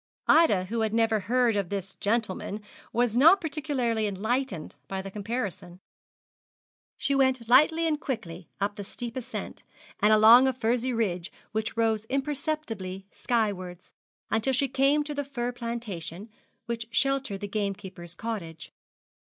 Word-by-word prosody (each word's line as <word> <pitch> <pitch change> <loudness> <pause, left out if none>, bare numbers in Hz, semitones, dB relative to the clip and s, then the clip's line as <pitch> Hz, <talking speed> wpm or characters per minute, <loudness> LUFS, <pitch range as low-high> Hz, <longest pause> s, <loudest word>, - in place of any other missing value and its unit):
Ida, 260 - +5
who 230 +5 -3
had 220 0 0
never 225 -1 +3
heard 235 +2 +2
of 200 -4 -1
this 195 -1 -4
gentleman, 210 -1 -1 0.3
was 240 -1 +1
not 325 +10 +7
particularly 275 - -1
enlightened 210 - -2
by 195 - -3
the 195 0 -6
comparison. 205 -4 -4 1.2
She 280 +1 0
went 260 -3 +2
lightly 305 +7 +5
and 305 -2 +1
quickly 185 - -5
up 205 +1 -1
the 205 - -4
steep 235 +4 -7
ascent, 255 -3 -6 0.4
and 210 +1 +4
along 225 +4 +8
a 265 - +2
furzy 245 +1 0
ridge 190 -7 -1 0.2
which 220 +1 -3
rose 220 -2 +1
imperceptibly 265 -8 -3
skywards, 195 -7 -2 0.4
until 225 +4 +1
she 275 +2 +2
came 275 +3 +3
to 295 0 -5
the 285 0 -2
fir 245 -3 -3
plantation 225 -6 -5 0.4
which 230 -1 -4
sheltered 270 -5 0
the 205 - -3
gamekeeper's 195 -4 -4
cottage. 180 -8 -6
225 Hz, 140 wpm, -27 LUFS, 200-260 Hz, 1.2 s, along